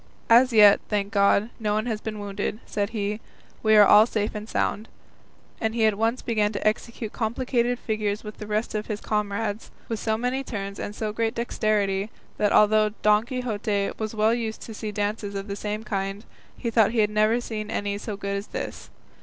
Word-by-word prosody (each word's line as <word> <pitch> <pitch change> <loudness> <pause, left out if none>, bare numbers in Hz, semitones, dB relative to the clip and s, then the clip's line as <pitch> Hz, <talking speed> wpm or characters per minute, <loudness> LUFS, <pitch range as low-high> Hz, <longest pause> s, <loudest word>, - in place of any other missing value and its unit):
"As 250 +3 +7
yet, 210 -3 +7
thank 205 0 -1
God, 200 +2 +3
no 210 -2 0
one 215 +1 0
has 220 -3 -2
been 215 -1 -5
wounded," 205 +1 -4
said 200 -1 -2
he, 210 -1 -2 0.4
"we 220 0 +4
are 210 -1 +9
all 210 +3 +7
safe 215 -3 -1
and 215 +1 -7
sound;" 215 +3 -1 0.7
and 220 0 -1
he 225 -2 +3
at 215 - +4
once 225 +4 0
began 215 -3 +1
to 205 - -1
execute 220 0 -2
complicated 240 +1 0
figures 215 -2 -2
with 210 -1 -9
the 210 - -7
rest 215 +2 -1
of 215 0 -3
his 210 -2 -3
comrades, 210 0 -2 0.2
with 225 -2 -2
so 220 0 0
many 250 +3 -1
turns 200 -5 -5
and 205 - -5
so 215 -1 -3
great 225 +2 -1
dexterity, 210 -4 0 0.3
that 210 - +2
although 215 0 +5
Don 210 +1 +4
Quixote 215 -6 -1
was 220 0 -3
well 215 +1 +3
used 225 -2 -3
to 225 - -8
see 215 0 -5
dances 205 0 -3
of 195 +1 -4
the 200 - -4
same 210 +1 -4
kind, 195 0 -3 0.3
he 235 - -3
thought 220 -1 +4
he 235 - +1
had 210 - -6
never 215 +2 +3
seen 215 -3 -5
any 205 0 -2
so 210 -1 -5
good 200 0 -3
as 200 - -6
this. - - -6
215 Hz, 205 wpm, -25 LUFS, 205-225 Hz, 0.7 s, are